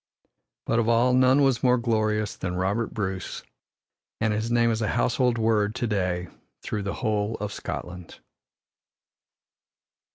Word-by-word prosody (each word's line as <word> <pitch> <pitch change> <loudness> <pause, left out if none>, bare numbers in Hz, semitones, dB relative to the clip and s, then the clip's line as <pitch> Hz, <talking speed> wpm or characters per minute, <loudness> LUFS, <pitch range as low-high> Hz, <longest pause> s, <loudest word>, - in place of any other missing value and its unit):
But 115 - +1
of 115 0 +1
all 120 +2 +3
none 130 +2 +5
was 135 -4 +2
more 125 -1 +4
glorious 110 -3 0
than 90 -1 -4
Robert 100 +5 -1
Bruce, 95 -4 -4 0.8
and 110 -1 +1
his 110 +2 -2
name 120 0 +3
is 110 0 -1
a 110 - 0
household 125 0 +2
word 110 -2 +1
to 120 - -1
day 90 -5 -1 0.4
through 105 - -3
the 100 0 -3
whole 105 0 0
of 105 -1 -5
Scotland. 90 -1 -7
110 Hz, 140 wpm, -25 LUFS, 105-120 Hz, 0.8 s, none